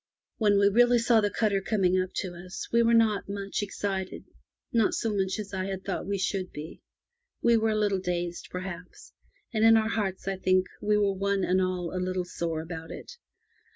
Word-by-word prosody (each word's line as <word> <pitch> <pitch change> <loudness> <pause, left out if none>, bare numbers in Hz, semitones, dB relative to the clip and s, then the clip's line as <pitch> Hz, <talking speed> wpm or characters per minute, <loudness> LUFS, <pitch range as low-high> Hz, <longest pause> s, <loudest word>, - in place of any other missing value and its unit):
When 205 -3 +3
we 200 0 +5
really 240 +4 +5
saw 230 -1 +4
the 205 - +1
cutter 205 -2 +1
coming 185 -3 +2
up 185 - -3
to 185 -3 -5
us, 180 +2 -7
we 235 - +5
were 230 0 +4
not 220 -3 +2
much 200 0 -3
excited 195 -2 -3 0.3
— - - -47
not 215 - +2
so 225 -2 -1
much 190 0 0
as 205 -2 -6
I 185 -1 -2
had 190 -1 -5
thought 195 - -3
we 200 0 -1
should 190 0 -2
be. 150 +2 -9 0.6
We 235 0 +5
were 225 0 +2
a 215 - +1
little 205 -2 +1
dazed, 175 -1 -3
perhaps, 180 - -8 0.4
and 220 -1 +1
in 225 0 +7
our 220 0 +1
hearts 200 -4 -2
I 195 -1 -1
think 185 0 +2 0.2
we 210 0 +2
were 200 -1 +2
one 195 0 0
and 185 +1 +2
all 185 -1 -2
a 185 - -1
little 185 0 -2
sore 165 -2 -3
about 165 -1 -7
it. - - -9
195 Hz, 210 wpm, -28 LUFS, 185-210 Hz, 0.6 s, in